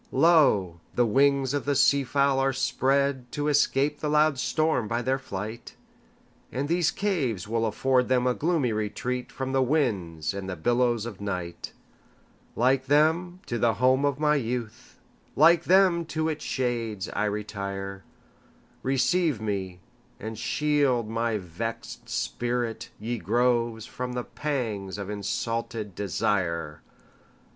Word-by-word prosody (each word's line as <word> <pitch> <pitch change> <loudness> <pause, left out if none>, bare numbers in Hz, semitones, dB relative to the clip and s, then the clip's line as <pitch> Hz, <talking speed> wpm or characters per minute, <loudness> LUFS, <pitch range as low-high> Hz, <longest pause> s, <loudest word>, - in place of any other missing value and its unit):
Lo! 110 - +4 0.2
the 120 - +4
wings 135 +3 +3
of 145 - -1
the 145 0 +1
sea 140 +1 +4
fowl 140 +1 +2
are 135 0 +2
spreadTo 135 +1 0
escape 145 0 +2
the 150 - -2
loud 150 -2 +3
storm 155 -6 +1
by 115 +2 -1
their 130 +2 0
flight; 110 -1 -7 0.8
And 135 +3 -2
these 170 0 +2
caves 135 - -1
will 115 +1 0
afford 130 +3 +1
them 125 -1 +2
a 125 - +3
gloomy 155 -4 0
retreatFrom 125 +5 -3
the 135 - +3
winds 100 - 0
and 100 -1 -5
the 95 - -3
billows 120 +4 +1
of 105 -4 -8
night; 90 -4 -5 0.8
Like 130 +2 +2
them, 165 +5 +2
to 120 - -3
the 115 -2 +2
home 130 +5 +3
of 140 -2 +1
my 150 0 +3
youth, 120 -3 -5 0.4
Like 165 +3 +5
them, 180 -2 +4
to 160 0 -1
its 155 -1 -4
shades 115 -6 -2
I 105 - -1
retire; 100 -2 -4 0.8
Receive 135 - +1
me, 95 -4 -4 0.4
and 110 +1 -6
shield 130 -1 +1
my 115 -1 0
vexed 110 +5 -6
spirit, 120 -1 -2
ye 115 +2 -3
groves, 115 +2 +1
From 125 0 -5
the 125 0 -2
pangs 115 -12 -3
of 100 0 -5
insulted 110 0 -3
desire! 85 -4 -1
125 Hz, 135 wpm, -26 LUFS, 105-140 Hz, 0.8 s, Like